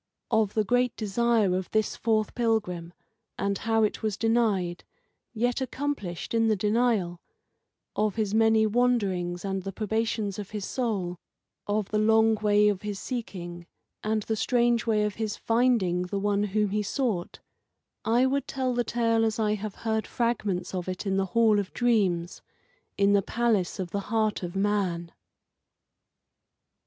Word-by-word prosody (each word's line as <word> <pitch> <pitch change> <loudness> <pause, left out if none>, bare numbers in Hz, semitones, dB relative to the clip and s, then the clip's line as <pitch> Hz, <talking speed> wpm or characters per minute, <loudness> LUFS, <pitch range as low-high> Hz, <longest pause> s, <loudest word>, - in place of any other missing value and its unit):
Of 220 -2 +2
the 215 - +3
great 245 +3 +1
desire 220 -2 +2
of 185 0 -3
this 215 -1 0
fourth 220 -2 0
pilgrim, 210 -8 -1 0.5
and 200 0 0
how 225 -1 +1
it 210 - 0
was 215 -2 -1
denied, 210 -7 +1 0.5
yet 245 +3 0
accomplished 260 - -3
in 225 -1 +3
the 215 - +3
denial; 210 -4 +1 0.7
of 210 -1 0
his 215 -2 -1
many 220 0 +4
wanderings 200 -7 0
and 195 -1 -2
the 195 +1 -5
probations 220 0 -2
of 205 - -6
his 205 -2 -4
soul; 195 -9 -2 0.5
of 205 -1 -1
the 215 - 0
long 220 +1 +4
way 210 -1 +3
of 205 -3 0
his 210 -1 -4
seeking 175 -8 -6 0.4
and 215 0 0
the 220 - -1
strange 240 0 +1
way 215 -2 +2
of 210 -1 -1
his 215 -2 -2
finding 225 -7 +2
the 180 +3 -3
One 205 +1 +1
whom 210 0 0
he 210 +1 +1
sought 210 -4 -2 0.7
I 235 +3 +3
would 275 +1 0
tell 260 -2 -1
the 240 0 +1
tale 230 -1 +1
as 220 -1 0
I 215 -2 +1
have 215 -1 -5
heard 220 -1 0
fragments 205 -7 -1
of 185 -1 -3
it 185 +3 -4
in 195 -1 0
the 195 - +1
Hall 220 -3 +5
of 200 -1 -4
Dreams, 190 -8 +1 0.6
in 200 0 +4
the 200 - +4
palace 220 -4 0
of 180 -3 -4
the 200 - -1
Heart 215 +1 0
of 175 0 -5
Man. 195 -4 0
215 Hz, 160 wpm, -27 LUFS, 195-230 Hz, 0.7 s, Hall